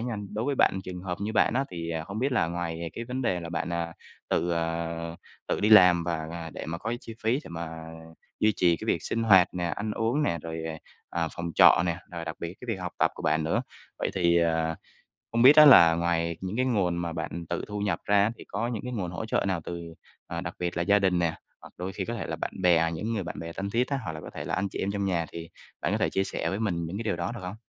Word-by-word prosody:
nha, 120 Hz, -1 st, -3 dB, 0.2 s
đối 110 Hz, -, -1 dB
với 140 Hz, +1 st, 0 dB
bạn, 95 Hz, -, +3 dB
trường 90 Hz, -1 st, -6 dB
hợp 90 Hz, -2 st, -4 dB
như 105 Hz, +2 st, -2 dB
bạn 110 Hz, +2 st, +3 dB
á, 135 Hz, +2 st, +2 dB
thì, 85 Hz, -1 st, -5 dB
à, 80 Hz, -1 st, -2 dB
hổng 100 Hz, +2 st, -5 dB
biết 135 Hz, +4 st, 0 dB
là 125 Hz, -, +2 dB
ngoài 85 Hz, -1 st, -4 dB
cái 115 Hz, -, -5 dB
vấn 125 Hz, +2 st, -3 dB
đề 90 Hz, -7 st, 0 dB
là 85 Hz, -, -6 dB
bạn, 85 Hz, +1 st, -3 dB
à, 85 Hz, -1 st, -2 dB, 0.4 s
tự, 85 Hz, -, +1 dB
ờ, 85 Hz, 0 st, -2 dB, 0.3 s
tự -, -, 0 dB
đi 105 Hz, -, +3 dB
làm 90 Hz, -5 st, +8 dB
và 80 Hz, -2 st, -2 dB, 0.3 s
để -, -, -6 dB
mà 85 Hz, +1 st, -4 dB
có 110 Hz, +4 st, -3 dB
chi 115 Hz, -, -9 dB
phí 115 Hz, +4 st, +2 dB
để -, -, -9 dB
mà 85 Hz, -1 st, -6 dB, 0.6 s
duy 110 Hz, 0 st, +4 dB
trì 85 Hz, -2 st, +4 dB
cái -, -, -8 dB
việc -, -, +1 dB
sinh 115 Hz, -, -1 dB
hoạt 95 Hz, -4 st, +6 dB
nè, 90 Hz, -, -2 dB
ăn 105 Hz, +5 st, -3 dB
uống 115 Hz, +8 st, 0 dB
nè, 85 Hz, -, 0 dB
rồi, 80 Hz, -1 st, -5 dB
ờ, 80 Hz, -1 st, -4 dB, 0.5 s
à, 80 Hz, -, 0 dB
phòng 85 Hz, 0 st, -4 dB
trọ -, -, +7 dB
nè, 85 Hz, 0 st, -1 dB
rồi 85 Hz, -1 st, -5 dB
đặc 80 Hz, 0 st, -5 dB
biệt 85 Hz, +2 st, -5 dB
cái 125 Hz, -, -9 dB
việc 105 Hz, -5 st, -2 dB
học 90 Hz, -1 st, -4 dB
tập -, -, +3 dB
của -, -, -9 dB
bạn 80 Hz, 0 st, +1 dB
nữa. 80 Hz, -, +1 dB, 0.4 s
Vậy -, -, -1 dB
thì, 85 Hz, -2 st, +3 dB
à, 80 Hz, -1 st, 0 dB, 0.6 s
hông 115 Hz, +1 st, +2 dB
biết 140 Hz, +4 st, +9 dB
á, 155 Hz, -, +11 dB
là 85 Hz, -, +9 dB
ngoài 85 Hz, 0 st, 0 dB
những 95 Hz, +4 st, -4 dB
cái 130 Hz, -, +2 dB
nguồn 95 Hz, -8 st, +1 dB
mà 85 Hz, -1 st, -2 dB
bạn 85 Hz, +1 st, -5 dB
tự 85 Hz, -, -2 dB
thu 105 Hz, 0 st, -4 dB
nhập 100 Hz, -1 st, 0 dB
ra 100 Hz, +1 st, +4 dB
thì -, -, -10 dB
có 110 Hz, +4 st, -2 dB
những 115 Hz, -4 st, -3 dB
cái 125 Hz, -, -4 dB
nguồn 95 Hz, -7 st, -3 dB
hỗ 110 Hz, +5 st, -5 dB
trợ -, -, 0 dB
nào 95 Hz, -3 st, 0 dB
từ, 85 Hz, -1 st, -6 dB, 0.3 s
à, -, -, -4 dB
đặc -, -, -5 dB
biệt 90 Hz, -1 st, -2 dB
là 85 Hz, -, +1 dB
gia 100 Hz, +3 st, +4 dB
đình 95 Hz, -2 st, +2 dB
nè, 85 Hz, -2 st, +1 dB, 0.3 s
hoặc -, -, -14 dB
đôi 90 Hz, +2 st, -4 dB
khi -, -, -3 dB
có 120 Hz, -, -4 dB
thể 115 Hz, -, -4 dB
là -, -, -3 dB
bạn -, -, -3 dB
bè, 85 Hz, -2 st, +4 dB
những 110 Hz, +8 st, -3 dB
người 100 Hz, -, -1 dB
bạn 85 Hz, -, -6 dB
bè 85 Hz, 0 st, -6 dB
thân 100 Hz, +3 st, -4 dB
thiết 120 Hz, +3 st, +1 dB
á, 140 Hz, -1 st, -1 dB
hoặc 80 Hz, -, -3 dB
là 80 Hz, -, -7 dB
có -, -, -9 dB
thể -, -, -5 dB
là -, -, -2 dB
anh 100 Hz, 0 st, -1 dB
chị -, -, -6 dB
em 100 Hz, -, -1 dB
trong 100 Hz, -1 st, -1 dB
nhà 85 Hz, -4 st, 0 dB
thì 85 Hz, 0 st, -7 dB, 0.3 s
bạn -, -, -1 dB
có -, -, +1 dB
thể -, -, +1 dB
chia 95 Hz, -, +1 dB
sẻ -, -, -3 dB
với 100 Hz, +3 st, -3 dB
mình 85 Hz, -6 st, -1 dB
những 85 Hz, +4 st, -5 dB
cái 115 Hz, -, -4 dB
điều 95 Hz, -, 0 dB
đó 85 Hz, +7 st, -3 dB
được 120 Hz, -, -7 dB
hông? 90 Hz, +3 st, -6 dB
90 Hz, 285 wpm, -27 LUFS, 85-105 Hz, 0.6 s, á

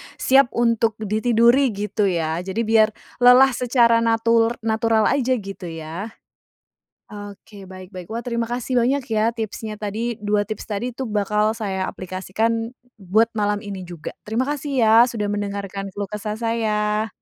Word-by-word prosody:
siap 270 Hz, 0 st, +4 dB
untuk 230 Hz, -2 st, +2 dB
ditiduri 235 Hz, +5 st, +3 dB
gitu 205 Hz, 0 st, -1 dB
ya. 165 Hz, -2 st, -1 dB
Jadi 190 Hz, +5 st, -3 dB
biar 220 Hz, -1 st, +4 dB, 0.3 s
lelah 255 Hz, +2 st, +7 dB
secara 235 Hz, -2 st, +3 dB
natur 230 Hz, 0 st, +2 dB
natural 225 Hz, 0 st, +2 dB
aja 260 Hz, -2 st, +1 dB
gitu 195 Hz, -4 st, -7 dB
ya? 165 Hz, +6 st, -6 dB, 1.0 s
Oke, 205 Hz, -1 st, -11 dB
baik 185 Hz, 0 st, -11 dB
baik. 180 Hz, -3 st, -9 dB
Wah 230 Hz, -, -3 dB
terima 235 Hz, -1 st, -2 dB
kasih 245 Hz, +2 st, -3 dB
banyak 270 Hz, +3 st, +1 dB
ya 220 Hz, +1 st, +2 dB
tipsnya 220 Hz, -1 st, -5 dB
tadi, 225 Hz, +3 st, -3 dB
2 205 Hz, 0 st, +1 dB
tips 215 Hz, -, -6 dB
tadi 235 Hz, +4 st, -3 dB
itu 265 Hz, -, -5 dB
bakal 210 Hz, +1 st, +1 dB
saya 190 Hz, -4 st, -2 dB
aplikasikan, 220 Hz, +5 st, -2 dB, 0.3 s
buat 210 Hz, +5 st, +2 dB
malam 205 Hz, 0 st, 0 dB
ini 200 Hz, -2 st, -6 dB
juga. 170 Hz, -3 st, -8 dB
Terima 225 Hz, +4 st, -1 dB
kasih 290 Hz, 0 st, -3 dB
ya, 220 Hz, -1 st, +5 dB
sudah 210 Hz, -3 st, -3 dB
mendengarkan 200 Hz, -1 st, -4 dB
keluh 200 Hz, 0 st, -5 dB
kesah 210 Hz, 0 st, -4 dB
saya. 220 Hz, -2 st, 0 dB
215 Hz, 150 wpm, -22 LUFS, 200-230 Hz, 1.0 s, lelah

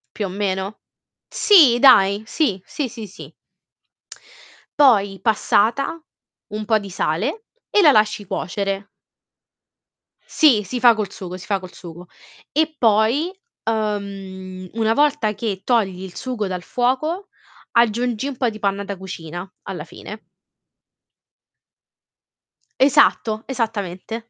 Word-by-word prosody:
Più 210 Hz, -, -2 dB
o -, -, -4 dB
meno? 195 Hz, +1 st, -3 dB, 0.5 s
Sì, 300 Hz, -, +5 dB
dai. 205 Hz, -6 st, +6 dB
Sì. 220 Hz, -, -1 dB
Sì, 285 Hz, -5 st, -4 dB
sì, 225 Hz, -2 st, -8 dB
sì. 190 Hz, -, -12 dB, 1.5 s
Poi 205 Hz, -9 st, +4 dB
passata, 235 Hz, +7 st, +1 dB, 0.5 s
un 215 Hz, 0 st, -4 dB
po' 220 Hz, 0 st, +2 dB
di 200 Hz, -1 st, -9 dB
sale, 195 Hz, -, -2 dB, 0.2 s
e 415 Hz, -, +4 dB
la 310 Hz, -5 st, +7 dB
lasci 215 Hz, -3 st, +2 dB
cuocere. 195 Hz, +2 st, -3 dB, 1.4 s
Sì, 260 Hz, -10 st, +4 dB
si 245 Hz, +6 st, -4 dB
fa 240 Hz, -1 st, +7 dB
col 210 Hz, -3 st, -4 dB
sugo, 185 Hz, -1 st, -7 dB
si 185 Hz, -, -11 dB
fa 200 Hz, -2 st, 0 dB
col 185 Hz, -1 st, -11 dB
sugo. 175 Hz, 0 st, -11 dB, 0.4 s
E 310 Hz, +1 st, 0 dB
poi, 230 Hz, -, +2 dB, 0.3 s
uhm, 195 Hz, -4 st, -4 dB
una 225 Hz, 0 st, +1 dB
volta 285 Hz, -5 st, +2 dB
che 205 Hz, -3 st, -4 dB
togli 195 Hz, -6 st, 0 dB
il 185 Hz, -2 st, -9 dB
sugo 240 Hz, -6 st, -3 dB
dal 185 Hz, -1 st, -4 dB
fuoco, 305 Hz, -, -1 dB, 0.4 s
aggiungi 235 Hz, +1 st, +1 dB
un 280 Hz, -3 st, -6 dB
po' 245 Hz, -2 st, +1 dB
di 215 Hz, -1 st, -9 dB
panna 200 Hz, -1 st, -1 dB
da 200 Hz, -1 st, -6 dB
cucina 175 Hz, -1 st, -8 dB
alla -, -, -6 dB
fine. -, -, -11 dB, 2.5 s
Esatto. 260 Hz, -5 st, +3 dB
Esattamente. 225 Hz, -2 st, -4 dB
215 Hz, 125 wpm, -21 LUFS, 195-250 Hz, 2.5 s, la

